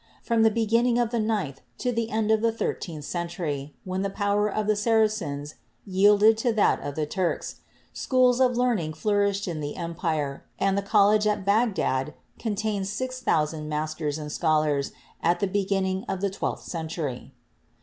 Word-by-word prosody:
From 230 -1 +2
the 220 - +6
beginning 230 +2 +2
of 240 -2 +1
the 235 - 0
ninth 210 -11 -1 0.2
to 250 - -1
the 230 -1 -1
end 220 -1 0
of 220 -1 +3
the 230 0 +3
thirteenth 165 -8 -4
century, 170 -5 -4
when 185 0 -3
the 200 - -1
power 205 +1 +1
of 215 +1 -1
the 215 0 +2
Saracens 210 -10 0 0.3
yielded 205 +3 +5
to 240 +1 +2
that 215 - +3
of 145 -1 -5
the 155 - -1
Turks, 180 +3 -2 0.4
schools 255 -1 +3
of 250 -2 +3
learning 225 -11 +1
flourished 200 +3 0
in 165 -3 -3
the 145 -1 -4
empire, 165 -5 -3
and 195 0 +1
the 200 - +1
college 210 +1 +4
at 205 -2 0
Bag 215 +1 +3
dad 135 -1 -1 0.2
contained 210 -3 -2
6,000 165 -11 -1
masters 155 0 -2
and 150 -1 -6
scholars 150 -3 +1 0.3
at 175 +1 +2
the 200 - +1
beginning 190 -1 0
of 190 - -2
the 200 0 -1
twelfth 195 - -3
century. 160 -6 -5
200 Hz, 170 wpm, -26 LUFS, 155-220 Hz, 0.4 s, the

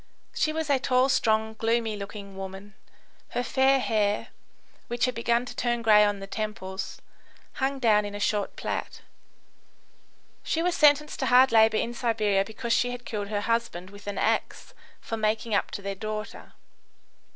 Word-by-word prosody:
She 310 - +1
was 320 -1 -2
a 275 - +3
tall, 255 +1 +2
strong, 220 -4 +2
gloomy 225 0 0
looking 200 -1 -8
woman; 195 +2 -8 0.6
her 245 - +1
fair 265 +2 +3
hair, 210 -4 0 0.6
which 240 0 0
had 255 - -1
begun 235 +1 0
to - - -9
turn 240 -1 -1
grey 210 -2 +6
on 205 -1 +1
the 195 - -7
temples, 195 -2 -5 0.6
hung 270 +1 0
down 220 -5 +3
in 205 0 -6
a - - -5
short 205 -1 -1
plait. - - -5 1.4
She 330 - -1
was 360 0 +1
sentenced 300 -1 +3
to - - 0
hard 255 +1 +6
labour 220 -1 +5
in 235 - -1
Siberia 215 -5 +1
because 230 +3 -3
she 245 +1 +2
had 245 0 -7
killed 205 -2 -4
her 205 0 -2
husband 230 -5 -2
with 205 0 -14
an 205 - -4
axe - - -1 0.3
for 225 - -5
making 215 +1 -1
up 200 - +1
to 200 - -7
their 200 0 -3
daughter. 215 +1 -6
220 Hz, 170 wpm, -27 LUFS, 205-245 Hz, 1.4 s, grey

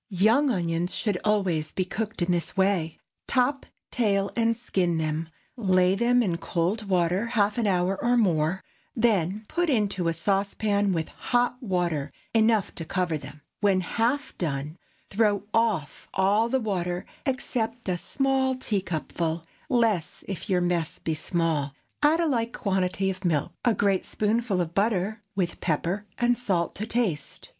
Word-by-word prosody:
✠ - - -60
Young 220 +9 +3
onions 175 -4 -1
should 205 -5 0
always 185 -8 +1
be 185 - -1
cooked 215 0 -3
in 175 - +1
this 175 +1 -1
way. 190 -5 +1 0.3
Top, 270 +2 +1 0.2
tail, 200 -4 +1
and 230 -1 +2
skin 180 -7 0
them, 160 +1 -2 0.3
lay 185 -5 +3
them 240 +4 +3
in 175 -6 0
cold 195 +6 -1
water 180 +4 +2
half 215 -1 +1
an 225 - +1
hour 185 0 +1
or 245 +1 +3
more, 180 -4 +2 0.3
then 215 -3 +1
put 350 -1 0
into 200 - +1
a 165 - +2
saucepan 200 +3 +1
with 165 -3 -1
hot 245 +1 0
water 175 - -1 0.2
enough 220 -2 +3
to 165 - -6
cover 175 0 -1
them. 145 0 -8 0.2
When 195 -2 +3
half 235 +10 -1
done, 150 0 -3 0.3
throw 205 -1 +2
off 215 -10 0
all 205 +4 +3
the 265 +2 +2
water, 180 -5 -2 0.2
except 245 -3 -2
a 185 - +1
small 265 +6 +1
teacupful—less, 180 - -1
if 195 +2 -5
your 180 -2 +3
mess 175 -2 0
be 160 - -2
small; 155 -3 -1 0.3
add 300 +3 +4
a 340 - +2
like 235 -6 0
quantity 190 -2 0
of 190 +1 -9
milk, 160 -5 0
a 235 -3 +3
great 195 -1 +1
spoonful 215 -2 0
of 170 -1 -3
butter, 210 +1 0
with 185 -3 -1
pepper 180 +5 -1
and 240 0 +2
salt 180 -8 0
to 215 +3 -3
taste. 205 - -2
195 Hz, 155 wpm, -26 LUFS, 175-230 Hz, 0.3 s, add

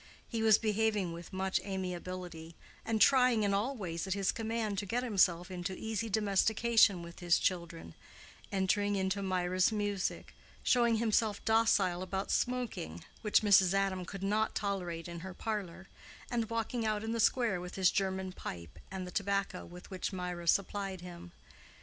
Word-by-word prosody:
He 230 -2 -3
was 220 -2 +6
behaving 210 -4 0
with 170 +1 -9
much 190 0 0
amiability, 180 -3 -5 0.3
and 225 -1 -1
trying 250 -3 +5
in 200 -1 +1
all 225 +8 0
ways 175 -3 -4
at 190 - 0
his 195 -2 +1
command 225 -3 -2
to 205 - -5
get 245 +5 -1
himself 185 -6 +2
into 185 +1 -4
easy 220 0 -3
domestication 215 -1 +3
with 170 0 -10
his 175 -1 +3
children—entering 185 - -2
into 190 +1 0
Mirah's 185 0 +1
music, 205 -3 -2 0.3
showing 235 -2 +4
himself 220 -2 +1
docile 220 -5 +3
about 190 +1 -3
smoking, 240 - -2 0.2
which 210 -2 +3
Mrs. 195 -2 +5
Adam 195 -2 0
could 195 +2 -7
not 215 +2 +1
tolerate 180 -5 -3
in 170 0 -6
her 185 +1 -8
parlor, 195 -4 -4 0.4
and 230 -2 -1
walking 230 +1 -2
out 215 -1 0
in 225 - -3
the 230 - -1
square 225 -5 +2
with 180 +1 -7
his 185 -2 +4
German 190 -1 -1
pipe, 85 - -8
and 190 -1 -5
the 180 - -8
tobacco 200 -1 -1
with 180 +3 -12
which 185 +1 -3
Mirah 180 -2 -5
supplied 195 0 0
him. 175 0 -10
195 Hz, 160 wpm, -32 LUFS, 180-220 Hz, 0.4 s, was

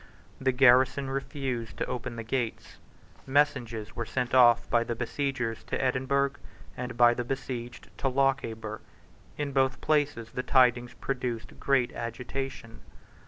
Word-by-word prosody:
The 130 0 +2
garrison 130 +1 +4
refused 135 -4 -4
to - - -1
open 120 -1 -4
the 115 - -5
gates. 120 0 -3 0.5
Messages 125 -6 0
were 115 - -2
sent 125 -2 -2
off 120 -2 +6
by 120 -1 +2
the 120 0 -3
besiegers 120 -1 -2
to - - -3
Edinburgh, 135 +2 +1 0.4
and 125 -1 -5
by 120 0 +6
the 120 - -3
besieged 120 -2 -5
to - - 0
Lochaber, 125 -5 0 0.6
In 145 -1 -2
both 135 -1 +1
places 145 -7 0
the 125 - -2
tidings 125 -2 +3
produced 125 -4 -4
great 135 -3 +2
agitation. 125 0 -5
125 Hz, 135 wpm, -28 LUFS, 120-135 Hz, 0.6 s, off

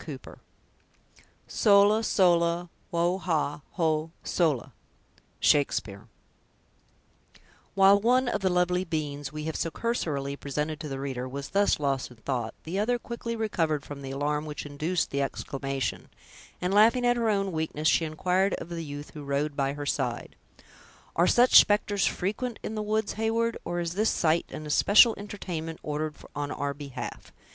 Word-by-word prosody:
CHAPTER - - -9
II. - - -33 0.2
"Sola, 205 +1 +4
sola, 175 -3 +2 0.2
wo 175 +2 +1
ha, 160 -4 -1
ho, 160 -2 0
sola!" 145 -7 0 0.7
—Shakespeare 110 -8 +1 1.7
While 195 +1 +6
one 250 +3 +3
of 210 -4 -1
the 190 - +2
lovely 180 0 +1
beings 145 -5 -4
we 155 0 -6
have 160 0 -3
so 165 - -1
cursorily 150 - -2
presented 150 +2 -3
to 155 - -6
the 135 -2 -5
reader 130 -2 -4
was 140 +1 -6
thus 200 -4 +2
lost 140 -3 -1
in 125 - -15
thought, 115 -1 -3
the 175 +5 -3
other 245 +4 +1
quickly 235 -1 -5
recovered 165 -10 -1
from 145 -1 -8
the 135 - -6
alarm 145 +2 -1
which 150 0 -6
induced 155 +5 -2
the 140 - 0
exclamation, 135 -2 -3 0.5
and, 180 +2 -1
laughing 230 +4 +5
at 245 0 +4
her 230 -2 +1
own 195 -2 0
weakness, 155 -1 -2
she 165 - +4
inquired 180 +5 +1
of - - -8
the 170 -1 -4
youth 145 -1 -8
who 150 - -9
rode 140 +1 -1
by 140 -1 0
her 145 0 -6
side: 125 -4 -2 0.8
"Are 170 +2 +4
such 245 +1 +7
specters 205 -1 +2
frequent 215 +5 -2
in - - -4
the 215 - -2
woods, 215 0 -1
Heyward, 225 +1 0
or 175 - -3
is 170 -1 -2
this 215 +4 +2
sight 165 0 +1
an 155 - -7
especial 205 +9 +6
entertainment 175 -6 -6
ordered 150 0 -3 0.2
on 145 0 -3
our 140 0 -2
behalf? 140 -2 -8
165 Hz, 160 wpm, -27 LUFS, 145-200 Hz, 1.7 s, such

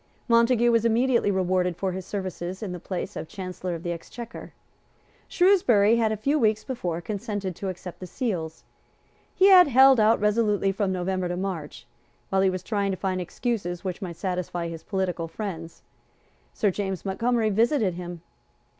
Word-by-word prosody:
Montague 235 0 +4
was 230 -1 +3
immediately 235 0 +2
rewarded 185 -2 0
for 190 +1 -1
his 185 0 -6
services 185 -1 -5
with 200 - -4
the 180 - -5
place 180 +1 -5
of - - -5
Chancellor 185 -2 -5
of 165 - -8
the 175 - -2
Exchequer. 225 +7 -8 0.8
Shrewsbury 240 - +4
had 225 -2 +2
a 215 - -1
few 280 +8 +1
weeks 215 -3 +2
before 175 -10 -3
consented 205 -2 -4
to 195 - -3
accept 180 -1 -8
the 185 - -7
seals. 170 -7 -4 0.7
He 390 +1 +6
had 365 -3 +8
held 265 -1 +6
out 220 +1 +4
resolutely 210 -2 +2
from 195 0 -1
November 185 0 -1
to 175 0 -3
March. 175 -9 -5 0.5
While 190 0 +3
he 190 - +4
was 185 -1 -4
trying 200 -1 -1
to 190 - -2
find 185 -1 -2
excuses 180 -2 -3
which 185 +1 -4
might 175 -3 -5
satisfy 175 -1 -3
his 165 -1 -7
political 180 -4 -2
friends, 165 -2 -7 0.7
Sir 205 - +1
James 190 -1 -4
Montgomery 225 +3 +1
visited 225 - +2
him. 175 -1 -7
195 Hz, 170 wpm, -25 LUFS, 180-225 Hz, 0.8 s, had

